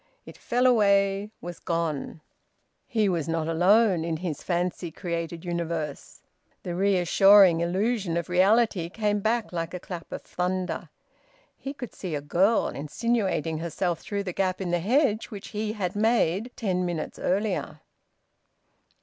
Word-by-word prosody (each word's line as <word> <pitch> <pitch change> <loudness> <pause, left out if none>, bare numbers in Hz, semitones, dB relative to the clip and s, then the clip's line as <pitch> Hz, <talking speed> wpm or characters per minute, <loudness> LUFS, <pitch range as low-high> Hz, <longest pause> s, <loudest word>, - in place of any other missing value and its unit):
It - - -11
fell 245 +2 0
away, 200 -4 +3
was 175 0 -7
gone. 165 -3 -3 0.7
He 220 -4 +1
was 170 -6 -1
not 165 -1 -1
alone 180 +2 +4
in 165 -1 -2
his 160 -3 -4
fancy 175 0 -2
created 170 0 -5
universe. 170 -4 -4 0.4
The 175 - -4
reassuring 195 0 +5
illusion 190 0 0
of 170 - -2
reality 190 0 +3
came 210 +1 0
back 220 0 -1
like 165 +1 -3
a - - -4
clap 175 -2 -8
of - - -6
thunder. 180 +1 -3 0.7
He 275 - -6
could 245 -4 -7
see 180 -5 -5
a - - -1
girl 190 +9 +2
insinuating 165 -1 -1
herself 170 +1 -2
through 200 -1 -4
the 180 -2 -4
gap 185 -1 0
in 185 -3 -3
the 175 - +2
hedge 225 - +2
which 205 -4 -9
he 215 0 -3
had 190 -4 -3
made 220 -1 +2
ten 185 -5 -1
minutes 170 -3 -4
earlier. 185 -5 -1
185 Hz, 145 wpm, -26 LUFS, 170-210 Hz, 0.7 s, reassuring